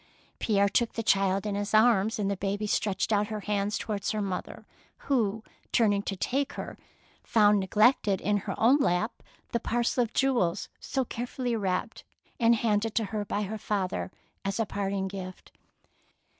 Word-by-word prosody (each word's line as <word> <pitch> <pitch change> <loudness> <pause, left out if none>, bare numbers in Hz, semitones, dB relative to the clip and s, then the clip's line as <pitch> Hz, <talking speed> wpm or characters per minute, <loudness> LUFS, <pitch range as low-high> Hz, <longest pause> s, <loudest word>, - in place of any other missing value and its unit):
Pierre 200 -2 +2
took 230 +4 +1
the 225 - -3
child 195 -1 +2
in 210 - -1
his 205 +1 -1
arms, 220 -1 +4
and 205 -2 -1
the 200 - 0
baby 200 +2 -2
stretched 205 0 0
out 205 0 +2
her 215 -1 -4
hands 205 0 -1
towards 205 -3 -3
her 215 - -1
mother, 190 -2 -5 0.4
who, 220 -6 +1 0.3
turning 205 -4 +3
to 200 - -4
take 270 +9 -1
her, - - -6 0.5
found 210 -2 +4
neglected 205 0 +3
in 205 +1 +1
her 195 -1 -5
own 245 +6 +5
lap 215 -3 0 0.3
the 235 - 0
parcel 240 +2 0
of 230 - -5
jewels 235 -10 +1
so 265 -2 -2
carefully 245 +1 -3
wrapped 195 +1 -2 0.4
and 235 -1 +5
handed 220 -1 0
to 225 - +2
her 210 -1 -1
by 205 +1 -2
her 215 +2 -5
father 185 - -2 0.3
as 195 +2 -2
a 225 - +2
parting 195 -1 -2
gift. 185 -1 -8
210 Hz, 170 wpm, -28 LUFS, 195-225 Hz, 0.5 s, own